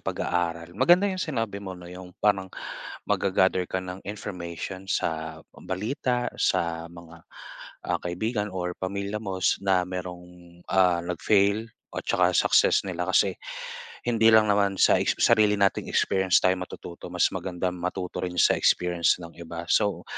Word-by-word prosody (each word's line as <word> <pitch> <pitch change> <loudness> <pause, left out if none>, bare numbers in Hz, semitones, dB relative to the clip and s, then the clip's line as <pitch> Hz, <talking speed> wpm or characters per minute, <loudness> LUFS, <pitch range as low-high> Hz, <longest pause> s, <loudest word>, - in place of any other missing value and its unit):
pag-aaral. 85 -1 -2
Maganda 175 - +4
'yong 185 - -4
sinabi 115 - -2
mo 95 -2 -7
na 90 0 -11
'yong 90 -1 -11
parang 95 -2 +2 0.6
mag-gagather 95 -1 +1
ka 95 0 -3
ng 90 +1 -7
information 95 -2 -6
sa, 80 -3 -2
ah, - - -19
balita, 120 +5 -2
sa 85 0 0
mga, 85 -1 -13 0.7
ah, - - +1
kaibigan 105 +4 -2
or 90 -1 -3
pamilya 100 +2 -3
mo 95 -3 -4
s - - +3
na 95 -2 +2
mayroong, 90 -1 -8
ah, 90 -2 +4
nag-fail 100 +5 +1 0.2
o - - -3
tsaka - - +2
success - - +4
nila. - - -2
Kasi, - - +3 0.7
hindi 115 -1 +4
lang 110 -1 +7
naman 100 -1 +2
sa - - +5
exp - - +1
sarili 105 -1 +4
nating 100 -1 +1
experience 95 -1 +2
tayo 95 - +3
matututo, 90 -1 -8
mas - - +3
magandang 90 0 -2
matuto 90 +1 -4
rin 90 0 -5
sa - - +5
experience 85 -1 +3
ng 85 - -10
iba. 85 0 -7
So, 105 -2 +1
95 Hz, 150 wpm, -26 LUFS, 90-100 Hz, 0.7 s, lang